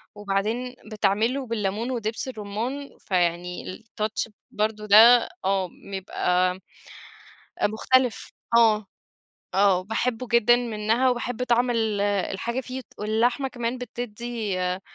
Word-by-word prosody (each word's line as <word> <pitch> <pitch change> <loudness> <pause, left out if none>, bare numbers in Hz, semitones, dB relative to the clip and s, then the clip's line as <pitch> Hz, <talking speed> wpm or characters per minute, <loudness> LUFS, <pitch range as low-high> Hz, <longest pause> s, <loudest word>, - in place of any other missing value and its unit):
وبعدين 210 +5 -2 0.2
بتعملُه 220 +6 +1
بالليمون 220 +2 -2
ودبس 225 0 -2
الرمان، 240 +5 -4
فيعني 180 -1 -1 0.2
الtouch 220 0 -3 0.2
برضه 215 0 -1
ده 225 +4 +7 0.2
آه 195 -1 +1 0.2
بيبقى 185 -1 0 1.1
مختلف، 245 +3 +1 0.3
آه، 215 -3 +4 0.7
آه، 195 -2 +4
باحبُّه 230 +3 -2
جدًا 235 0 +5
منها 230 +1 +1
وباحبّ 245 -1 -3
طعم 245 0 +2
ال 220 -3 0
الحاجة 205 +4 -1
فيه 260 0 -6 0.2
واللحمة 235 +6 +1
كمان 240 0 -3
بتدّي 235 -4 -4
آآ، 180 +1 -1
220 Hz, 105 wpm, -25 LUFS, 205-245 Hz, 1.1 s, ده